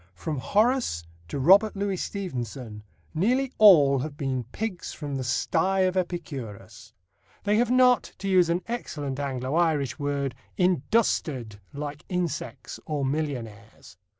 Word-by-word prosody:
From 150 Hz, -, -4 dB
Horace 215 Hz, -, +1 dB, 0.2 s
to -, -, -4 dB
Robert 195 Hz, +10 st, +5 dB
Louis 200 Hz, -1 st, -1 dB
Stevenson, 125 Hz, -, -5 dB, 0.3 s
nearly 250 Hz, +11 st, +1 dB
all 150 Hz, -10 st, +7 dB
have 145 Hz, +2 st, -5 dB
been 130 Hz, -4 st, -2 dB
pigs 185 Hz, -, -5 dB
from 145 Hz, -2 st, -5 dB
the 135 Hz, -, -2 dB
sty 175 Hz, +9 st, +1 dB
of 185 Hz, 0 st, +2 dB
Epicurus. 160 Hz, -, -5 dB, 0.5 s
They 210 Hz, +1 st, +2 dB
have 240 Hz, 0 st, +2 dB
not, 250 Hz, -2 st, +4 dB
to 195 Hz, -, -5 dB
use 185 Hz, -3 st, +4 dB
an 175 Hz, +2 st, 0 dB
excellent 145 Hz, -, -4 dB
Anglo 130 Hz, -1 st, -3 dB
Irish 160 Hz, -5 st, +1 dB
word, 140 Hz, -2 st, -1 dB, 0.2 s
"industered" 155 Hz, -, +1 dB
like 145 Hz, +1 st, -6 dB
insects 175 Hz, -5 st, -4 dB
or 145 Hz, -3 st, -1 dB
millionaires. 120 Hz, -, -5 dB
155 Hz, 130 wpm, -26 LUFS, 135-195 Hz, 0.5 s, all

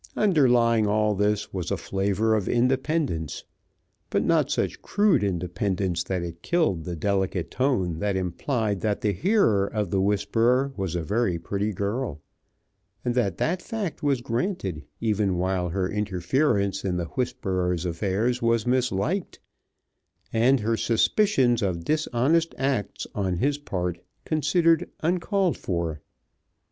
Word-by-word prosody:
Underlying 120 Hz, -, +4 dB
all 105 Hz, 0 st, +2 dB
this 105 Hz, +1 st, 0 dB
was 90 Hz, -3 st, -3 dB
a -, -, 0 dB
flavor 100 Hz, +3 st, 0 dB
of 105 Hz, -4 st, 0 dB
independence, 130 Hz, -, 0 dB, 0.7 s
but -, -, +1 dB
not -, -, +2 dB
such -, -, -1 dB
crude 205 Hz, -, +2 dB
independence 90 Hz, -1 st, -1 dB
that 95 Hz, -2 st, -2 dB
it 85 Hz, 0 st, -7 dB
killed 150 Hz, -, 0 dB
the 90 Hz, -, -4 dB
delicate 95 Hz, 0 st, -1 dB
tone 95 Hz, -, 0 dB
that 100 Hz, 0 st, 0 dB
implied 100 Hz, -, -1 dB
that 105 Hz, 0 st, -1 dB
the 105 Hz, -, +2 dB
hearer 110 Hz, -, +2 dB
of 105 Hz, -4 st, -2 dB
the 95 Hz, -, +2 dB
whisper 115 Hz, +7 st, +2 dB
was 95 Hz, -3 st, -3 dB
a 85 Hz, -, -1 dB
very 100 Hz, 0 st, 0 dB
pretty 100 Hz, +5 st, -2 dB
girl, 100 Hz, -, -3 dB, 0.9 s
and 120 Hz, -, +1 dB
that 110 Hz, -8 st, 0 dB
that 180 Hz, +2 st, 0 dB
fact 215 Hz, -7 st, -4 dB
was 140 Hz, -4 st, +1 dB
granted 115 Hz, -, -2 dB, 0.2 s
even 105 Hz, -4 st, +1 dB
while 90 Hz, 0 st, 0 dB
her 90 Hz, +2 st, -1 dB
interference 100 Hz, -, 0 dB
in 90 Hz, -2 st, -1 dB
the 85 Hz, -, -2 dB
whisperer's 90 Hz, -6 st, -2 dB
affairs 100 Hz, +8 st, 0 dB
was 115 Hz, -1 st, +2 dB
misliked, 125 Hz, -, 0 dB, 1.0 s
and 120 Hz, +3 st, +4 dB
her 115 Hz, +2 st, +1 dB
suspicions 120 Hz, -, +2 dB
of 90 Hz, -4 st, -2 dB
dishonest 155 Hz, +2 st, +1 dB
acts 135 Hz, -6 st, -1 dB
on 95 Hz, -3 st, -1 dB
his 140 Hz, +8 st, 0 dB
part 90 Hz, -10 st, -3 dB, 0.3 s
considered 165 Hz, +2 st, +2 dB
uncalled 180 Hz, +2 st, +1 dB
for. 85 Hz, -4 st, -3 dB
105 Hz, 135 wpm, -25 LUFS, 95-130 Hz, 1.0 s, Underlying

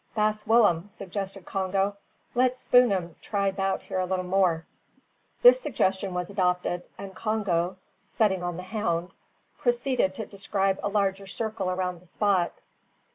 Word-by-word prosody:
"Baas 215 Hz, 0 st, 0 dB
Willem," 205 Hz, -6 st, +4 dB
suggested 195 Hz, -1 st, -6 dB
Congo, 195 Hz, +1 st, 0 dB, 0.4 s
"let 255 Hz, +1 st, +2 dB
Spoor'em 200 Hz, -11 st, +3 dB
try 200 Hz, -2 st, 0 dB
'bout 195 Hz, 0 st, -1 dB
here 185 Hz, -, -2 dB
little 185 Hz, 0 st, -1 dB
more." 180 Hz, -3 st, +2 dB, 0.8 s
This -, -, +8 dB
suggestion 190 Hz, -, 0 dB
was 180 Hz, -1 st, -2 dB
adopted, 180 Hz, -2 st, 0 dB
and 195 Hz, -1 st, -8 dB
Congo, 190 Hz, -5 st, -1 dB, 0.3 s
setting 195 Hz, -5 st, +1 dB
on 175 Hz, -1 st, -3 dB
the 180 Hz, -, -6 dB
hound, 185 Hz, -4 st, -2 dB, 0.5 s
proceeded 240 Hz, -6 st, +1 dB
to 220 Hz, -, -4 dB
describe 195 Hz, -1 st, -1 dB
a 205 Hz, -, -1 dB
larger 195 Hz, -1 st, 0 dB
circle 215 Hz, -1 st, -3 dB
around 180 Hz, -1 st, -2 dB
the 180 Hz, -, -17 dB
spot. 190 Hz, -1 st, +1 dB
195 Hz, 135 wpm, -27 LUFS, 180-210 Hz, 0.8 s, This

